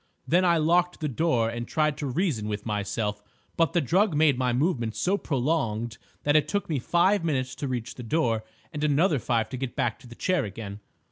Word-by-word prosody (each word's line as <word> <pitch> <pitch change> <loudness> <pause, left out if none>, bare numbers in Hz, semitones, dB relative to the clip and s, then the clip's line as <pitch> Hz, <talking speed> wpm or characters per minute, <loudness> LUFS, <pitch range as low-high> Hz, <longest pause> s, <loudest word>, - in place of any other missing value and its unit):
Then 180 +3 +4
I 170 -2 +4
locked 175 +3 +2
the 155 - -1
door 130 -4 +1
and 120 +1 -4
tried 155 -2 +1
to 145 - -3
reason 130 - -1
with 105 -1 -4
myself, 105 0 -2 0.3
but 165 -1 +2
the 175 - +3
drug 180 - +2
made 150 -2 +4
my 125 0 0
movements 120 -4 0
so 190 +3 +2
prolonged 120 - -1 0.2
that 145 +1 +2
it 155 - +4
took 200 0 -1
me 150 -5 -1
five 175 +8 +2
minutes 135 -5 -1
to 140 - -3
reach 125 -2 -3
the - - -9
door, 115 -4 0 0.3
and 150 0 -3
another 150 +1 +3
five 115 -2 0
to 130 - -5
get 130 -1 -4
back 115 -2 -1
to - - -15
the 120 - -11
chair 185 0 +1
again. 100 -1 -7
140 Hz, 210 wpm, -26 LUFS, 115-165 Hz, 0.3 s, Then